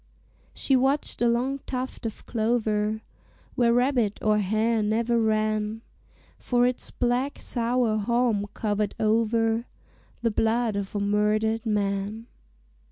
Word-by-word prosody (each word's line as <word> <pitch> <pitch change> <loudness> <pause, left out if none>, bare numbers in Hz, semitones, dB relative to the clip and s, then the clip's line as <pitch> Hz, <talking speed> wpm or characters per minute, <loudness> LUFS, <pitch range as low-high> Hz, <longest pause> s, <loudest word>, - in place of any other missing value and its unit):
She 270 - +2
watched 270 +2 +1
a 240 - +4
long 250 +4 0
tuft 255 -2 -4
of 220 - -9
clover, 220 -2 0 0.5
Where 240 -3 +3
rabbit 245 -3 +2
or 215 0 +3
hare 215 +3 +1
never 230 +2 +1
ran, 215 0 0 0.6
For 245 -1 +2
its 250 0 -1
black 250 +3 -1
sour 235 -2 0
haulm 230 -1 +1
covered 210 -1 -1
over 225 +1 +1 0.6
The 230 - +2
blood 225 +1 +1
of 200 0 -4
a - - +1
murdered 210 +2 +1
man. 205 +1 -1
225 Hz, 120 wpm, -26 LUFS, 215-240 Hz, 0.6 s, a